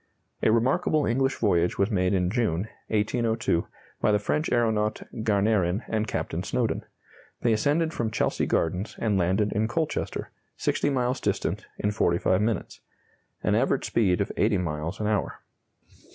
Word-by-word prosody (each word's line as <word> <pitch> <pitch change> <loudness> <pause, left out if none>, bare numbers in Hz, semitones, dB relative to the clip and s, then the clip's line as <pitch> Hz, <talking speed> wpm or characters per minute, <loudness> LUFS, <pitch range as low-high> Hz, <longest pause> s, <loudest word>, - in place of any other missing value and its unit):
A - - +4
remarkable 140 +6 +2
English 135 +3 +1
voyage 90 -5 +1
was 100 +3 +1
made 95 -1 +2
in 90 -1 +1
June, 105 -5 0 0.2
1802, 110 -3 0 0.3
by - - +3
the 105 - +4
French 150 +10 -1
aeronaut 110 -3 +1 0.2
Garnerin 105 -2 +2
and 110 0 -1
Captain - - -2
Snowdon. - - -1 0.6
They 115 - +4
ascended 155 +9 +1
from 115 -7 -1
Chelsea - - 0
Gardens 90 +6 -1
and 110 -3 0
landed 95 +4 +1
in 110 +2 +1
Colchester, 155 +7 -2 0.3
60 - - 0
miles 125 -2 0
distant, - - -1
in 105 - 0
45 90 -1 +2
minutes: 110 -4 -2 0.6
an 105 - +2
average 130 +4 +2
speed 100 -5 +2
of 100 - -1
80 105 -1 +3
miles 85 +1 -3
an 105 - -2
hour. 105 -1 -1
105 Hz, 150 wpm, -26 LUFS, 95-120 Hz, 0.6 s, A